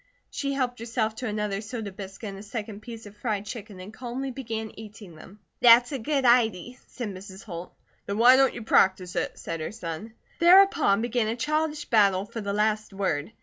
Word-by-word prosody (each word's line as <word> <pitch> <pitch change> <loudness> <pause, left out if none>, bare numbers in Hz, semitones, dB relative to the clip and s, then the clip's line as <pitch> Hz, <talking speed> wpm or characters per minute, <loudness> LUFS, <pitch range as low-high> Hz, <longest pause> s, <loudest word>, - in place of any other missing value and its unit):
She 275 -1 -2
helped 250 -3 -2
herself 225 -1 -1
to 250 - -4
another 210 -2 -2
soda 220 -2 -6
biscuit 195 +2 -8
and 195 0 -8
a - - -9
second 210 -1 -6
piece 230 -1 -9
of 205 0 -12
fried 210 -2 -3
chicken 205 -2 -8
and 190 +4 -10
calmly 255 +3 -5
began 225 -4 -5
eating 210 -4 -11
them. 190 +6 -15 0.2
"That's 240 +2 +7
a 275 - -3
good 275 +3 0
idy!" 240 -1 +2
said 240 -4 -6
Mrs. 190 0 -10
Holt. 175 -3 -8 0.3
"Then 200 - -2
why 245 +3 +7
don't 270 0 +3
you 235 - -6
practice 185 -4 +2
it?" - - -2
said 165 0 -5
her 155 - -4
son. 210 +1 -7 0.3
Thereupon 340 - +5
began 240 -2 0
a 225 - -1
childish 305 +3 -1
battle 200 -6 +3
for 230 +1 -7
the 200 -1 -3
last 215 0 0
word. 190 -4 -2
220 Hz, 195 wpm, -26 LUFS, 200-245 Hz, 0.3 s, That's